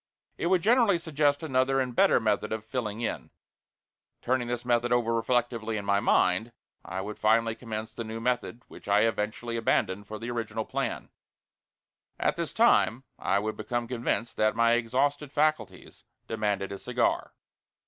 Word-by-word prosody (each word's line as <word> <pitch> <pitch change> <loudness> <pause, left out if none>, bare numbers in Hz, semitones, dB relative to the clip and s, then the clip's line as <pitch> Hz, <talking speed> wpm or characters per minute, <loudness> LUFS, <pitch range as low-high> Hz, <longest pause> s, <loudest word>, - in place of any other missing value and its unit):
It - - 0
would 180 -1 +2
generally 230 -4 +4
suggest 150 -3 0
another 135 -2 +1
and 125 -2 -2
better - - +5
method 105 -1 0
of 110 -1 -3
"filling 115 -2 -3
in." 115 - -3 0.9
Turning 125 -1 0
this 120 0 -3
method 120 0 +1
over 120 -1 +2
reflectively 115 -1 0
in 100 - -5
my 100 0 +3
mind, 100 +4 +2 0.3
I 95 +3 -4
would 105 +2 -7
finally 115 +1 +3
commence 110 -1 -6
the 115 - -5
new 110 0 -6
method 125 0 -2
which - - -14
I 100 +1 +4
eventually 115 +2 -1
abandoned 105 -3 0
for 110 - -6
the 115 +2 -5
original 110 -2 -3
plan. - - -3 1.1
At - - +1
this - - -3
time 120 +4 +3 0.2
I - - +1
would 110 +2 -2
become 120 +2 -3
convinced 120 -1 -2
that 110 0 +2
my 115 0 +4
exhausted 135 +5 0
faculties 130 -13 -1 0.2
demanded 105 -3 -1
a 100 - -6
cigar. - - -1
115 Hz, 160 wpm, -28 LUFS, 110-125 Hz, 1.1 s, better